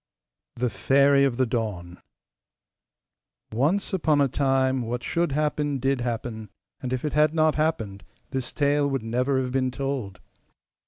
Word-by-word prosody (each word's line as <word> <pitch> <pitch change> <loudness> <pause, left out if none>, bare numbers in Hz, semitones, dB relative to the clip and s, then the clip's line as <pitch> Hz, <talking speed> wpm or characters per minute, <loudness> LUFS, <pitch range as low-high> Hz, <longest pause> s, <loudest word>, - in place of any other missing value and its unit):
THE 125 -1 -1
FAIRY 140 +7 +4
OF 125 -4 -1
THE 130 - +3
DAWN 105 -7 -4 1.5
Once 155 - +1
upon 155 -5 +2
a 140 - +4
time 130 -1 +1
what 120 +1 -3
should 170 -2 0
happen 150 -1 0
DID 135 0 0
happen; 115 -2 -4 0.3
and 125 - -4
if 130 +2 -2
it 150 - -2
had 150 +1 +3
not 155 -1 +3
happened 115 -11 -1 0.3
this 130 -2 -3
tale 145 0 +1
would 135 -4 -2
never 125 +4 0
have 130 -1 -2
been 130 0 +1
told. 130 -6 -4
135 Hz, 150 wpm, -25 LUFS, 120-145 Hz, 1.5 s, FAIRY